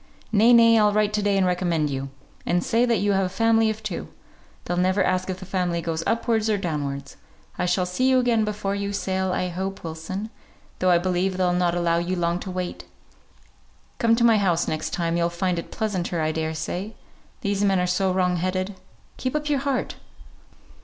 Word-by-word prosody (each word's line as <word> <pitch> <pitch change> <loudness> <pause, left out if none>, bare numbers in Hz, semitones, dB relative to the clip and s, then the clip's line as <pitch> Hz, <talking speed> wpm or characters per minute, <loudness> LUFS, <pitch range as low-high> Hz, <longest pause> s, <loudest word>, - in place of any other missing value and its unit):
"Nay, 220 +2 +5
nay! 230 -1 +7
I'll 210 -1 +4
write 210 0 +1
to 210 - +1
day 200 -1 +1
and 190 - +3
recommend 175 -4 0
you; 135 0 -4 0.3
and 175 0 0
say 235 +2 +2
that 235 -2 +2
you 205 0 +2
have 195 -1 +2
a - - -6
family 225 +3 +3
of 220 0 -4
two. 205 -5 -4 0.6
They'll 175 - -2
never 185 +2 +2
ask 185 +1 0
if 185 - -2
the 190 - -9
family 180 -2 -1
goes 165 -1 -2
upwards 225 -1 +1
or 210 - +2
downwards. 145 -6 -4 0.4
I 180 - +1
shall 180 +1 +1
see 255 +9 +1
you 260 - +4
again 240 -3 +2
before 210 -2 -2
you 200 0 -3
sail, 190 -1 -1
I 180 0 -1
hope, 190 +3 -5
Wilson; 170 +6 -5 0.5
though 185 - +2
I 175 - +6
believe 185 +1 0
they'll 180 -1 +2
not 175 -1 +1
allow 170 -1 +1
you 175 +2 -2
long 170 0 0
to 190 - -7
wait. 180 -1 -4 1.1
Come 230 -1 +4
to 235 - +1
my 225 -2 +5
house 175 -4 +1
next 155 0 -2
time; 170 -2 -1
you'll 170 0 +1
find 175 0 -1
it - - -8
pleasanter, 185 -5 -2
I 155 0 +1
daresay. 160 +6 -3 0.5
These 200 -3 0
men 195 -2 +3
are 180 - +1
so 185 +1 +1
wrong 180 -1 +1
headed. 185 +3 -2 0.4
Keep 255 +2 -3
up 300 0 -1
your 285 -2 +2
heart!" 275 -1 -2
185 Hz, 205 wpm, -24 LUFS, 175-210 Hz, 1.1 s, nay